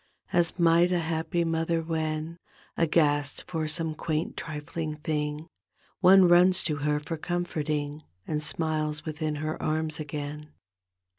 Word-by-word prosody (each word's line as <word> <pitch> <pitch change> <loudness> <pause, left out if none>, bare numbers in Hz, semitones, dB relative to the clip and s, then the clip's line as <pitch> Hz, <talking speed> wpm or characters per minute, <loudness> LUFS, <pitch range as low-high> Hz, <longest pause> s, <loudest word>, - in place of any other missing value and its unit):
Ai 175 - +5
might 170 +1 +4
a 180 - +3
happy 165 +1 -1
mother, 165 0 0
when. 160 0 -3 0.4
Aghast 145 -3 +2
for 160 -3 -3
some 160 +1 -1
quaint, 155 +1 -2
trifling 155 0 -5
thing. 150 0 -3 0.5
One 190 0 +7
runs 180 +1 +5
to 150 -3 -1
her 150 +1 0
for 160 +2 -5
comforting. 155 -3 -2 0.2
And 150 -1 -2
smiles 155 0 -1
within 155 -1 -2
her 155 +1 -3
arms 155 0 -1
again. 150 0 -6
155 Hz, 130 wpm, -27 LUFS, 150-165 Hz, 0.5 s, One